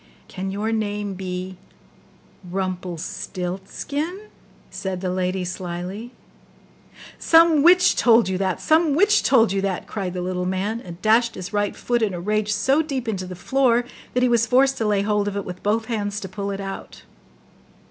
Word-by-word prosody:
'Can 190 +1 -5
your 205 +3 -2
name 205 -2 -2
be 185 0 -5 0.9
RUMPELSTILTSKIN?' 190 - -4 0.4
said 190 -2 -4
the 180 -1 -2
lady 185 0 -1
slyly. 180 +5 -5 1.1
'Some 325 -2 +5
witch 360 +4 +6
told 230 -3 +5
you 190 - -1
that! 190 -2 -1
some 315 -2 +3
witch 410 +6 +4
told 225 -6 +4
you 195 0 0
that!' 195 -2 -2
cried 190 -4 -4
the 180 - -2
little 180 0 -2
man, 200 +5 -2
and 175 -4 -10
dashed 230 +2 +3
his 185 +2 -7
right 205 -1 0
foot 240 -1 -1
in 205 -4 0
a - - -5
rage 210 +3 0
so 265 +8 +2
deep 270 -6 -4
into 190 -4 -3
the 180 - -7
floor, 245 +3 +2 0.3
that 250 - +2
he - - +5
was 230 -1 +3
forced 265 +3 +4
to 220 - 0
lay 205 -1 +2
hold 210 0 +1
of 205 - -3
it 200 - -3
with 180 0 -7
both 220 +2 0
hands 210 -3 -2
to 190 - -5
pull 200 +2 -5
it 200 0 -4
out. 195 -1 -7
205 Hz, 175 wpm, -23 LUFS, 185-235 Hz, 1.1 s, witch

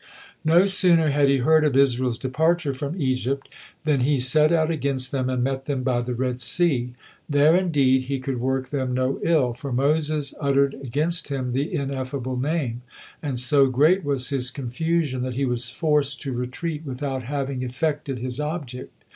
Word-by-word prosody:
No 170 +4 +5
sooner 180 -6 +3
had 140 0 +3
he 140 - +3
heard 155 +5 +3
of 145 -3 +2
Israel's 130 -3 +2
departure 155 +4 0
from 145 +6 -5
Egypt, 130 0 -1 0.4
then 150 -3 +1
he 140 +3 +2
set 150 +5 +6
out 165 -1 +2
against 140 -4 0
them 130 -2 -1
and 125 -1 -1
met 135 0 -2
them 135 -3 -2
by 125 -2 0
the 120 0 -4
Red 125 0 -2
Sea. 125 -8 +1 0.3
There, 145 +3 +4
indeed, 140 -8 +2
he 135 +1 -2
could 130 -1 -4
work 130 +1 -2
them 130 -3 -2
no 130 +1 -1
ill, 145 -8 +2
for 135 +3 -7
Moses 150 +2 0
uttered 140 -1 +2
against 145 +6 -2
him 130 -3 -3
the 135 +4 -2
Ineffable 130 -2 -3
Name; 130 -3 -2 0.4
and 140 -5 -3
so 135 +2 +3
great 155 +9 +3
was 140 -2 0
his 130 -3 0
confusion, 140 +1 -2
that 125 -1 -3
he 140 +2 0
was 120 -2 0
forced 150 -1 0
to 135 -3 -4
retreat 140 +6 -4
without 135 -1 -4
having 135 0 -3
effected 135 +2 -2
his 125 +2 -5
object. 150 -5 -5
135 Hz, 175 wpm, -23 LUFS, 130-150 Hz, 0.4 s, set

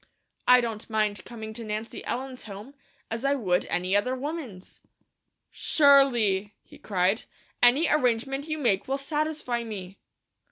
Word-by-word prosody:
I 250 0 +8
don't 225 -2 -5
mind 215 -2 0
coming 220 -2 -8
to 230 +1 -8
Nancy 215 +1 -5
Ellen's 255 +1 -4
home, 210 +6 -9 0.4
as 225 +2 -3
I 275 +1 +2
would 185 -9 +1
another 195 +8 0
woman's." 260 - -7 0.7
"Surely!" 240 -9 +3
he - - -16
cried. 190 +2 0 0.4
"Any 260 +7 +5
arrangement 270 +1 +1
you 310 0 -2
make 235 -6 +1
will 270 +1 0
satisfy 295 -4 -2
me." 195 -4 -8
235 Hz, 130 wpm, -27 LUFS, 205-275 Hz, 0.7 s, I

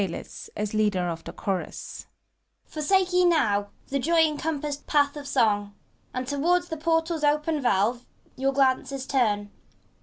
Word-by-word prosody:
PANTHALIS 175 -3 -6
(as 210 0 -2
LEADER 205 -5 +1
OP 165 -1 -5
THE - - -6
ChOBUS). 195 -4 -5 0.6
Forsake 370 +4 +1
ye 360 0 +4
now 210 -13 +2 0.2
the 275 - 0
joy 330 +4 +3
encompassed 300 -2 -1
path 285 -1 +2
of 290 -1 -7
Song, 205 -6 +1 0.4
And 255 0 -4
toward's 345 +6 +1
the 320 - -4
portal's 325 0 0
open 300 +1 +1
valves 240 +1 +1 0.3
your 270 +1 +1
glances 270 0 +1
turn! 210 -7 0
275 Hz, 145 wpm, -26 LUFS, 210-315 Hz, 0.6 s, ye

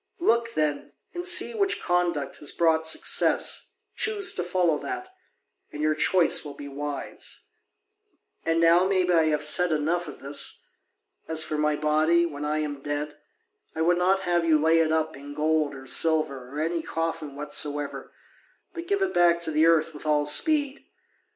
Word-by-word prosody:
Look, 235 -8 0
then, 150 -2 -2 0.2
and 350 0 -3
see 360 +6 +6
which 400 -3 0
conduct 175 -5 -1
has 145 - -5
brought 160 -1 +1
success, 160 - +1 0.3
choose 410 -3 0
to - - -3
follow 175 -3 0
that, 375 -1 -6 0.6
and 150 - -9
your 155 0 +1
choice 170 +3 +2
will 145 -2 -9
be 145 - -9
wise. 145 +1 -7 1.0
And 165 0 0
now 170 +2 +4
maybe 185 -2 +1
I 165 -2 +3
have 150 -1 +1
said 175 +3 +2
enough 160 +3 -1
of 145 - -10
this. 140 +1 -1 0.6
As 160 -1 +3
for 155 - -4
my 150 0 0
body, 155 +3 +2
when 145 -3 -6
I 150 +1 -1
am 145 -2 -5
dead, 145 +1 -4 0.6
I 160 - -3
would 175 +1 +2
not 190 +2 +2
have 175 -2 0
you 160 -2 +3
lay 160 +2 +3
it 160 -1 +1
up 160 0 -1
in 145 +1 -11
gold 155 -1 0
or 135 0 -11
silver 145 -4 +1
or 145 +3 -7
any 165 +2 -1
coffin 165 -3 -4
whatsoever, 145 0 -2 0.6
but 340 0 -8
give 400 -1 0
it 385 - -2
back 175 -1 +3
to 165 - 0
the 155 +1 +3
earth 165 -1 +2
with 150 +1 -10
all 150 -1 +2
speed. 290 - +2
160 Hz, 175 wpm, -25 LUFS, 150-175 Hz, 1.0 s, see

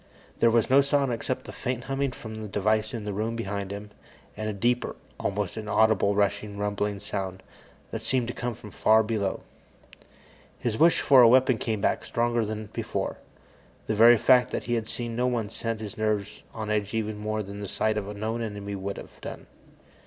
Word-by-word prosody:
There 115 - +5
was 115 -1 +3
no 135 +2 +6
sound 140 -2 +1
except 120 +2 -3
the - - -7
faint 125 -1 -3
humming 135 0 -1
from 110 -3 -8
the 110 - -5
device 110 +2 +1
in 115 -3 -5
the 105 -1 -3
room 110 +3 -2
behind 100 -3 -3
him, 100 +1 -7 0.4
and 110 0 -3
a - - 0
deeper, 120 +5 0 0.2
almost 100 -1 -2
inaudible, 110 -1 +2
rushing, 100 0 0
rumbling 105 0 -1
sound 95 -2 -4 0.5
that - - -4
seemed 125 -3 0
to 120 - -3
come 120 -1 -3
from 105 -2 -11
far 110 0 +4
below. 105 -3 -1 1.2
His 120 -3 -2
wish 165 +7 +5
for 135 -3 +7
a 120 - +9
weapon 130 -1 +4
came 110 -3 -2
back, - - +1
stronger 120 0 0
than 110 -1 -5
before. - - -3 0.7
The 110 - -1
very 115 +2 +8
fact 125 +1 +5
that - - -3
he 120 - -2
had 115 -2 -1
seen 120 -1 -4
no 125 +1 +1
one 115 -4 -1
set 115 -1 -3
his 110 -1 -7
nerves 105 -2 -1
on 110 -1 -4
edge 105 0 -1
even 110 -1 -2
more 110 0 -2
than 100 +1 -8
the 100 - -4
sight 110 +3 0
of 105 -1 -3
a 105 - -6
known 110 +3 -2
enemy 100 -2 -4
would 100 0 -4
have - - -11
done. - - -7
110 Hz, 200 wpm, -27 LUFS, 105-120 Hz, 1.2 s, a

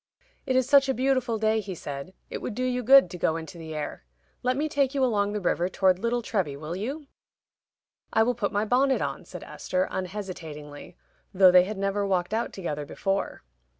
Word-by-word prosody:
"It 260 - +1
is 255 -1 +3
such 275 -1 +5
a 265 - +1
beautiful 255 -3 +1
day," 220 0 +2
he 195 -3 -5
said, 145 +4 -7 0.2
"it - - -4
would 225 - -4
do 255 - -2
you 250 0 0
good 270 -1 +7
to 180 - -7
go 160 - +1
into 165 +1 -7
the 160 -1 -7
air. 150 - -5 0.4
Let 255 +1 0
me 305 +2 0
take 285 -2 0
you 270 - +2
along 205 -4 +1
the 210 - -1
river 175 -1 0
toward 185 -1 +2
Little 235 +2 -1
Treby, 180 -12 -1
will 155 +3 -5
you?" 270 +10 -4 1.1
"I 220 - +4
will 245 +2 +1
put 220 -4 -2
my 205 +1 0
bonnet 265 +4 +2
on," - - -4
said - - -9
Esther, 185 0 -2
unhesitatingly, 175 -7 -7 0.4
though 185 -1 +7
they 180 0 +7
had 210 +1 -5
never 195 +1 0
walked 185 -1 0
out 225 +1 -1
together 150 -6 -4
before. 195 +6 -3
205 Hz, 205 wpm, -26 LUFS, 180-250 Hz, 1.1 s, good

